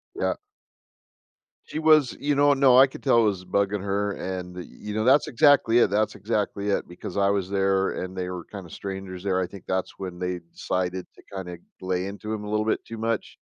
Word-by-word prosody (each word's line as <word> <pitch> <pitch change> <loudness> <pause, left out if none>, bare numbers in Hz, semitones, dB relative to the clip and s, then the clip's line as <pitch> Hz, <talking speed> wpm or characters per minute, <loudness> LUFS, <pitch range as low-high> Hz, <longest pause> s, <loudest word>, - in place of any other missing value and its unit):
Yeah. - - 0 1.3
She 155 - -4
was, 155 -5 +4
you 145 0 +1
know 145 0 +5
no, 135 -2 +5
I 135 - +9
could 130 - -10
tell 120 -4 +4
it - - +3
was 100 -3 0
bugging 100 +2 0
her, 100 +1 -1
and, 90 -2 -5
you 105 +3 -9
know, 110 +1 0
that's 135 +5 +5
exactly 125 -3 +5
it, 120 - +4
that's 105 +2 +1
exactly 105 -2 -2
it, 100 - 0
because 90 +2 -8
I 100 0 +3
was 100 -2 -1
there 95 -1 +1
and 95 0 -7
they 90 -1 -3
were 90 -2 -6
kinda 95 -4 -9
strangers 95 0 -6
there; 95 -2 +1
I 90 - -1
think 100 -1 -12
that's 95 0 -2
when 90 -2 -6
they 90 -1 -3
decided 90 0 -2
to - - -18
kinda 90 -2 -6 0.2
lay 95 0 -1
into 105 +2 -6
him 110 -1 -3
a 105 - -6
little 105 0 0
bit - - 0
too 115 -1 -8
much. 115 -2 -2
100 Hz, 215 wpm, -25 LUFS, 95-110 Hz, 1.3 s, I